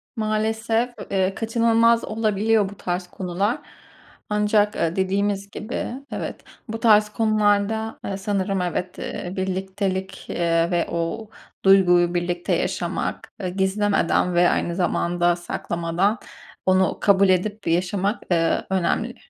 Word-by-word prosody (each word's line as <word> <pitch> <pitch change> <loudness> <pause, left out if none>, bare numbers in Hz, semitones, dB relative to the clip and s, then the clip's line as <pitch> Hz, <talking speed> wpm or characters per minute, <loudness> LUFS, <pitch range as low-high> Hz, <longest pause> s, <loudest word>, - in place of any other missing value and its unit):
Maalesef, 225 +2 0 0.2
eee, 190 0 +1
kaçınılmaz 230 +1 +3
olabiliyor 215 -1 +1
bu 200 - -12
tarz 180 0 -3
konular. 190 +6 -2 0.7
Ancak, 210 0 +2
eee, 165 0 0
dediğimiz 200 +1 0
gibi 215 +3 -4 0.2
evet - - -5 0.3
bu 225 0 -5
tarz 215 -2 +5
konularda, 215 0 +1
eee, 195 - -3
sanırım 195 -1 -1
evet, 180 +1 -3
eee, 180 +1 -5
birliktelik, 190 0 -3
eee, 170 0 +1
ve 175 -1 +1
o 170 +6 -3 0.4
duyguyu 180 -3 +5
birlikte 175 0 -1
yaşamak, - - -3
eee, 185 - -2
gizlemeden 190 -1 +1
ve 175 0 +4
aynı 170 - -1
zamanda 175 -1 +1
saklamadan 175 +3 -1 0.5
onu 185 0 +3
kabul 200 -1 +4
edip 200 +3 0
yaşamak, 185 +5 0
eee, 165 -1 +2
önemli. 205 +6 0
195 Hz, 120 wpm, -23 LUFS, 180-215 Hz, 0.7 s, tarz